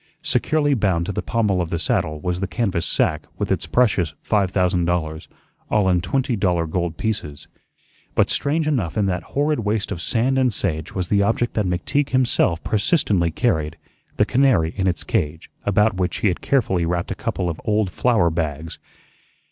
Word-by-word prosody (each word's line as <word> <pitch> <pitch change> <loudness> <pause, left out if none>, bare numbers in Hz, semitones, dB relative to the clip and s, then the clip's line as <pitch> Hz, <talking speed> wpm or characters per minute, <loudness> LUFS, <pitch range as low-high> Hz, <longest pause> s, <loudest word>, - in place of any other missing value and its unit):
Securely 150 -2 +1
bound 95 -8 +1
to 100 - -3
the - - -2
pommel 105 -5 0
of 85 - -3
the 85 - -1
saddle 75 -1 -1
was 90 +3 -2
the 95 - -2
canvas 95 -6 -1
sack - - +1 0.2
with - - -2
its - - -1
precious 95 -11 +2
five 100 -3 +1
thousand 90 -2 +1
dollars, 80 -3 -2 0.4
all 105 -3 +2
in 90 -2 +3
twenty 125 +7 0
dollar 90 -5 +1
gold 85 0 -2
pieces. 85 -10 -3 0.7
But - - +4
strange 155 +2 0
enough 115 - -1
in 105 - +2
that 90 -2 -1 0.2
horrid 150 0 +2
waste 105 -1 -1
of 85 - -4
sand 130 +7 +1
and 130 -2 +3
sage 80 -7 -3
was 90 -2 -2
the 100 -1 +3
object 115 +4 +1
that 105 -3 0
McTeague 135 +11 0
himself 125 -10 +1
persistently 100 - +1
carried 80 - 0 0.4
the - - +4
canary 115 -12 +2
in 95 -2 0
its 90 - -1
cage, 75 +2 -2 0.2
about 105 0 +3
which 90 -2 -1
he 105 - +3
had 90 - -3
carefully 110 -10 +1
wrapped 85 +1 -1
a - - +1
couple 90 - -3
of 80 -2 -4
old 105 -3 +1
flour 110 -7 +2
bags. 80 -1 -3
95 Hz, 185 wpm, -22 LUFS, 85-115 Hz, 0.7 s, But